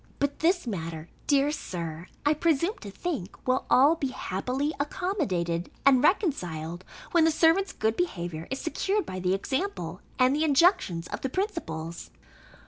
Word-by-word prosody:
But 285 0 -1
this 350 +1 +2
matter, 165 -6 -5 0.2
dear 285 0 +3
Sir, 170 - -5 0.2
I 295 - +5
presume 335 +5 +1
to 205 - -8
think, 215 - -4
will 255 +1 +1
all 280 +5 +6
be 305 -5 -1
happily 260 +6 -2
accommodated 260 - -1 0.2
and 265 -2 +6
reconciled, 180 - 0 0.3
when 340 -2 +5
the 325 - +5
servants' 330 +5 +3
good 220 +1 0
behaviour 175 - -3
is 265 - -2
secured 390 +5 -1
by 185 - -5
the 185 +1 +1
example 200 - -3 0.2
and 255 +2 +4
injunctions 295 - +3
of - - -5
the 265 - -1
principals. 170 - -4
265 Hz, 145 wpm, -28 LUFS, -, 0.3 s, all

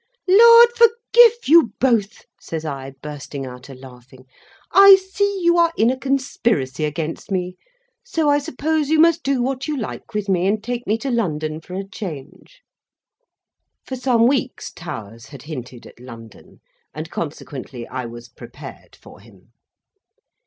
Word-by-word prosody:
"Lard 465 +5 +8
forgive 465 0 +5
you 305 - +5
both!" 230 -5 0
says 160 -1 -6
I, 135 -2 -6
bursting 145 -2 -7
out 125 +1 -11
a 135 - -10
laughing; 130 0 -15 0.5
"I 395 0 +9
see 385 +1 -2
you 345 0 +3
are 335 -1 +3
in 225 +3 +3
a 260 - -5
conspiracy 235 - -1
against 155 +1 -5
me, 180 -2 -3 0.5
so 330 -11 -2
I 290 0 +3
suppose 295 +2 -2
you 320 - +3
must 335 +1 +4
do 270 -3 -1
what 265 +2 -3
you 300 -1 -2
like 230 -1 -7
with 210 -1 -2
me, 185 -1 +1
and 210 +1 -1
take 245 0 -5
me 215 - +1
to 270 +3 -4
London 155 -9 -2
for 180 +3 -10
a 195 +1 -5
change." 195 - -10 1.2
For 260 - -5
some 245 -2 +2
weeks 260 0 -1
Towers 115 - -9
had 140 -4 -12
hinted 130 -5 -9
at - - -16
London, 115 -3 -14 0.3
and 155 +2 -7
consequently 135 -5 -7
I 130 -1 -5
was 120 0 -11
prepared - - -13
for - - -17
him. 100 0 -21
205 Hz, 155 wpm, -20 LUFS, -, 1.2 s, I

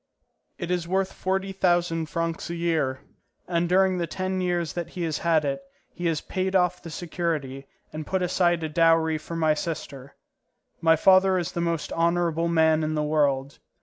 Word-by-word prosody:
It 175 -1 -4
is 175 -2 -1
worth 190 +1 0
forty 190 +1 -2
thousand 175 -3 +1
francs 165 -1 -3
a 170 - -3
year, 160 -6 0 0.5
and 170 -1 0
during 185 0 +3
the 170 - -1
ten 185 +1 -2
years 175 -2 -1
that 175 -1 -4
he 180 - -5
has 160 -3 -2
had 160 -3 +2
it, 140 +2 -2 0.3
he 175 -1 -3
has 160 -2 0
paid 190 0 -2
off 180 -1 +2
the 170 - -9
security 155 -5 -3 0.3
and 155 -1 -6
put 190 -1 0
aside 175 -2 +1
a 160 - -2
dowry 165 0 +3
for 170 - -7
my 160 -2 +3
sister. 140 -4 -6 0.7
My 160 0 +5
father 190 +3 +5
is 175 -2 -2
the 170 - -3
most 170 -2 -2
honourable 170 0 +1
man 160 -1 +3
in 155 0 -1
the 150 - 0
world. 145 -2 0
170 Hz, 180 wpm, -25 LUFS, 155-180 Hz, 0.7 s, My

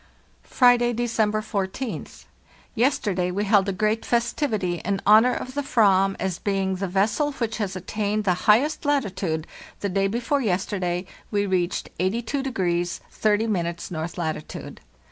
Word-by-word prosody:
"Friday, 245 -1 +4
December 220 -2 0
14th. 215 +3 -4 0.5
Yesterday 215 -8 +1
we 195 +3 -1
held 200 -1 +3
a - - +1
great 215 +3 0
festivity 230 - 0
in 195 +1 -1
honor 220 +4 +6
of 255 - -5
the 285 - -1
fvam 195 -8 +3
as 185 -2 -2
being 195 -1 0
the 195 +1 -2
vessel 215 - +1
which 230 -4 -3
has 200 -4 -2
attained 210 +3 -2
the 185 -3 +3 0.2
highest 270 +9 +4
latitude 190 - -1 0.4
(the 200 - -1
day 195 +1 +1
before 240 +7 0
yesterday 185 -3 -1 0.2
we 205 -1 0
reached 185 -2 -1
82° 190 -4 -1
30' 205 -6 0
north 160 +1 -4
latitude). 160 -3 -5
205 Hz, 135 wpm, -24 LUFS, 185-235 Hz, 0.5 s, honor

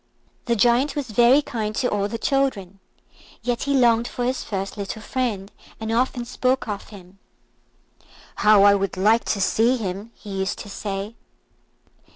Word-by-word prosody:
The 235 - +1
Giant 245 +6 +3
was 275 -6 -4
very 240 +6 +5
kind 215 -4 -4
to 245 - +1
all 205 -2 0
the 230 - -4
children, 225 -8 -1 0.6
yet 245 +1 -1
he 280 0 +1
longed 235 -2 +3
for 245 - -3
his 255 +1 -1
first 195 -1 -4
little 200 +1 -5
friend, 215 -4 -3 0.3
and 220 0 -4
often 245 +1 0
spoke 255 +1 0
of 205 -2 -5
him. 195 -2 -14 1.2
"How 210 -1 +5
I 200 0 +7
would 195 -2 -1
like 215 +5 +3
to 205 - -1
see 230 +6 +2
him!" 200 0 -5
he 210 - -11
used 190 0 -2
to 205 - -9
say. 200 +1 -4
220 Hz, 165 wpm, -23 LUFS, 200-245 Hz, 1.2 s, I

